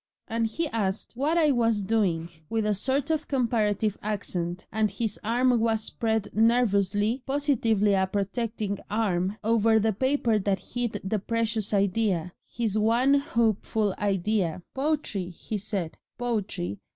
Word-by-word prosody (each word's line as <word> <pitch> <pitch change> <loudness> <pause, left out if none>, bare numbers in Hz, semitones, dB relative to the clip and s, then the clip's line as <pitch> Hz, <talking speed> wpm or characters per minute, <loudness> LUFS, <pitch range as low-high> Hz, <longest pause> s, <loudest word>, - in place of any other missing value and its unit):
And 230 -1 0
he 325 +9 -1
asked 205 -4 -2
what 295 +7 +1
I 310 -3 +4
was 230 -5 +2
doing 190 -6 0 0.2
with 225 -1 0
a 210 - +2
sort 270 +8 0
of 310 -1 -1
comparative 220 -5 0
accent, 185 -4 -3
and 215 0 +1
his 210 +2 -2
arm 245 +2 +2
was 225 -1 +1
spread 220 -2 -1
nervously, 220 0 +2
positively 235 -8 +2
a 190 -1 +2
protecting 205 +1 -2
arm, 200 -2 0
over 225 0 +3
the 220 0 +2
paper 245 -1 +1
that 195 -1 0
hid 245 -2 -1
the 205 +3 -1
precious 225 0 -1
idea 195 -3 +1
his 220 -3 -2
one 235 +6 +3
hopeful 220 -6 +1
idea. 195 -3 0
"'Poetry,' 270 - -1
he 205 +4 -5
said, 190 -5 -4 0.2
'Poetry. 210 - -2
220 Hz, 140 wpm, -27 LUFS, 200-235 Hz, 0.2 s, I